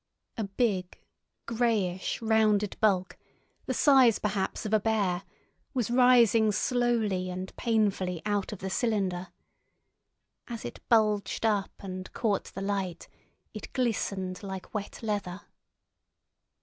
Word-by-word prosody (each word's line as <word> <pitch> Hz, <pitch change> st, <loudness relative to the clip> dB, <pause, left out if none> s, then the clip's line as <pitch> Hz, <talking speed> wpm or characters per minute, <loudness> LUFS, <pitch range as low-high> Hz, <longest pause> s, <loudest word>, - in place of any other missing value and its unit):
A 220 Hz, -, -2 dB
big 195 Hz, -3 st, -1 dB, 0.5 s
greyish 225 Hz, -5 st, 0 dB
rounded 215 Hz, -2 st, +2 dB
bulk, 190 Hz, -4 st, +1 dB, 0.5 s
the -, -, 0 dB
size, 265 Hz, -6 st, +6 dB
perhaps, 205 Hz, 0 st, -2 dB
of 215 Hz, -, -2 dB
a 215 Hz, -, +5 dB
bear, 200 Hz, -4 st, 0 dB, 0.5 s
was 240 Hz, -2 st, 0 dB
rising 240 Hz, -3 st, +5 dB
slowly 220 Hz, -5 st, 0 dB
and 185 Hz, +1 st, -6 dB
painfully 200 Hz, -6 st, 0 dB
out 205 Hz, -2 st, -1 dB
of 210 Hz, -, -5 dB
the 190 Hz, -, -3 dB
cylinder. 190 Hz, -4 st, 0 dB, 1.2 s
As 235 Hz, -2 st, -6 dB
it 120 Hz, -, -7 dB
bulged 215 Hz, -2 st, +2 dB
up 205 Hz, -3 st, +1 dB
and 185 Hz, -2 st, -7 dB
caught 210 Hz, -4 st, 0 dB
the 195 Hz, -, -8 dB
light, 195 Hz, -3 st, -3 dB, 0.5 s
it -, -, -8 dB
glistened 195 Hz, -7 st, -1 dB
like 190 Hz, -2 st, -7 dB
wet 210 Hz, +1 st, -5 dB
leather. 200 Hz, -3 st, -3 dB
205 Hz, 120 wpm, -29 LUFS, 190-225 Hz, 1.2 s, size